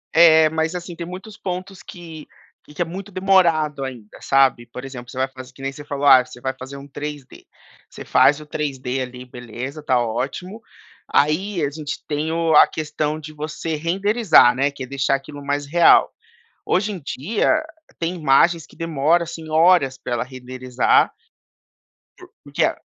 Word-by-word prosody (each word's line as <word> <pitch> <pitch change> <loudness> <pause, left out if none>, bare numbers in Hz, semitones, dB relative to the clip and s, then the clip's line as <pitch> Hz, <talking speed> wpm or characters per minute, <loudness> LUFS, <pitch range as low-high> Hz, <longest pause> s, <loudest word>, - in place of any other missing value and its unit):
É, 160 -1 +7
mas 160 +2 -1
assim, 175 -1 -6
tem 170 0 -6
muitos 190 +4 -9
pontos 185 +1 -6
que 165 -3 -11 0.4
que 150 +4 -8
é 175 - +2
muito 190 +4 -8
demorado 170 -7 +2
ainda, 125 -5 -7
sabe. 135 -3 +3
Por 125 +2 -9
exemplo, 125 -2 -9
você - - -11
vai 130 0 +1
fazer 130 -1 -12
que 135 +1 -16
nem 135 0 -3
você 145 - -10
falou: 145 -1 -4
"Ah, 130 -2 +8
você 125 - -13
vai 130 +1 -3
fazer 135 +2 -9
um 140 +1 -11
3D". 145 -1 -8 0.4
Você - - -10
faz 145 +1 +4
o 150 - -11
3D 135 -4 -3
ali, 125 0 -7
beleza, 125 +4 -8
está 130 -4 +1
ótimo. 140 - -4 0.5
Aí, 170 +5 +1
a 145 - +1
gente 150 0 -6
tem 150 +1 -2
o 165 -1 +1
a - - +9
questão 155 0 -3
de 155 0 -10
você 155 +1 -4
renderizar, 180 - +4
né, 140 +2 +1
que 140 - -8
é 130 - -7
deixar 135 0 0
aquilo 140 +1 -8
mais 145 0 -1
real. 170 +4 +5 0.6
Hoje 200 +3 +1
em 190 - -6
dia, 160 - -2 0.5
tem 170 +2 -2
imagens 165 +1 +3
que - - -20
demora, 165 +1 +1
assim, 165 -1 -8
horas 155 -5 +4
pra - - -8
ela 120 - 0
renderizar. 130 -1 0 1.1
Por - - -16
porque - - -1
a - - -3
150 Hz, 180 wpm, -21 LUFS, 135-170 Hz, 1.1 s, a